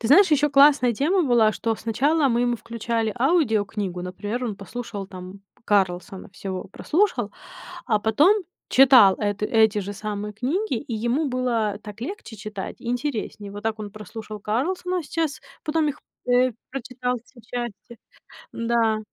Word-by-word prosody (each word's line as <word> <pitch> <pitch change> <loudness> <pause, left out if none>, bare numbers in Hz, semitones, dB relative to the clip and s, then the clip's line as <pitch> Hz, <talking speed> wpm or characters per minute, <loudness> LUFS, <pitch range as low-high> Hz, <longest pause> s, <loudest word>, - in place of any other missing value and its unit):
Ты 225 - -2
знаешь, 360 +4 +7
ещё 295 0 +3
классная 275 -3 +6
тема 345 - +2
была, 235 -6 +4
что 225 0 -1
сначала 275 +6 +2
мы 235 0 +1
ему 240 -1 +1
включали 230 -1 -2
аудиокнигу. 215 - +1
Например, 205 +7 -4
он 210 -4 -3
послушал 205 -1 -6
там 185 +1 -10 0.2
"Карлсона" 190 -2 0
всего 190 -2 -5
прослушал, 255 - 0 0.5
а 215 -4 +2
потом 285 - +4 0.4
читал 255 -7 +8
эт 205 -1 -1
эти 220 -1 +3
же 200 0 -5
самые 210 +1 -5
книги, 290 - -1
и 250 - -6
ему 240 +7 0
было 235 -5 0
так 210 +1 -10
легче 245 - -6
читать, 205 -2 -6
и - - -8
интереснее. 235 -5 -3
Вот 205 +1 -8
так 225 -1 -1
он 205 -2 -6
прослушал 215 +1 -8
"Карлсона", 355 - -1
сейчас 315 -1 -2 0.2
потом 305 -1 +1
их, 295 - -5 0.3
э, 250 +1 +4 0.2
прочитал 250 -1 -3
все 250 - -19
части. 235 -1 -6 0.6
Да. 230 -2 +1
230 Hz, 150 wpm, -24 LUFS, 210-270 Hz, 0.6 s, читал